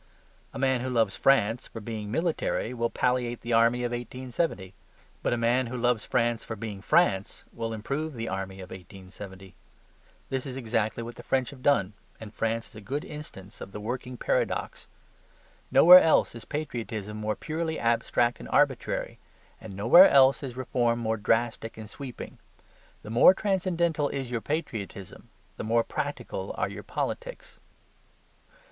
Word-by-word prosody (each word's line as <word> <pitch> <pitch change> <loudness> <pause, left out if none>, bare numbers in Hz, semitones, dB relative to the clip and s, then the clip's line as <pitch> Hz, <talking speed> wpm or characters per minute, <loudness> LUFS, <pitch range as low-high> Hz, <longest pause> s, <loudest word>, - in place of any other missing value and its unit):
A - - -8
man 130 -2 +1
who 130 - -3
loves 115 -5 +1
France 120 -2 +2
for 115 - -8
being 110 -1 -6
military 160 -3 -1
will 115 -1 -1
palliate 125 -1 0
the 120 +1 -3
army 115 +2 +4
of 120 - -1
1870. 120 - -3 0.5
But - - 0
a 120 - +1
man 120 +2 +2
who 125 +2 -5
loves 120 -2 +1
France 120 -1 0
for 110 - -6
being 105 -2 -6
France 105 - +1
will 115 -1 -4
improve 140 +7 -3
the 115 -1 -4
army 95 0 -4
of 90 - -11
1870. 95 +1 -11 0.8
This 135 0 -3
is 130 -1 -6
exactly 115 -2 -1
what 120 +1 -8
the - - -8
French 130 0 0
have 135 -3 -13
done, 110 -8 +2 0.3
and 110 -1 -10
France 115 0 -2
is - - -22
a 110 - -9
good 140 +8 -4
instance 110 -10 -10
of 95 - -8
the - - -5
working 125 +3 -5
paradox. - - -1 0.8
Nowhere 180 +2 +10
else 160 - +3
is 115 - -10
patriotism 115 -8 -4
more 110 0 -2
purely 160 +4 -3
abstract 120 +1 +1
and - - -9
arbitrary; - - +1 0.4
and 110 -3 -9
nowhere 120 - +8
else 135 -1 +5
is 130 -3 -6
reform 120 -2 0
more 110 -1 -1
drastic 115 +1 0
and 110 -1 -8
sweeping. 125 +3 -9 0.6
The 105 - -8
more 120 +11 +7
transcendental 175 -7 0
is 135 -3 -4
your 115 -2 -2
patriotism, 110 - -5 0.3
the - - -4
more 115 +2 +2
practical 145 +2 -4
are - - 0
your - - -7
politics. - - -5
120 Hz, 160 wpm, -27 LUFS, 110-135 Hz, 0.8 s, Nowhere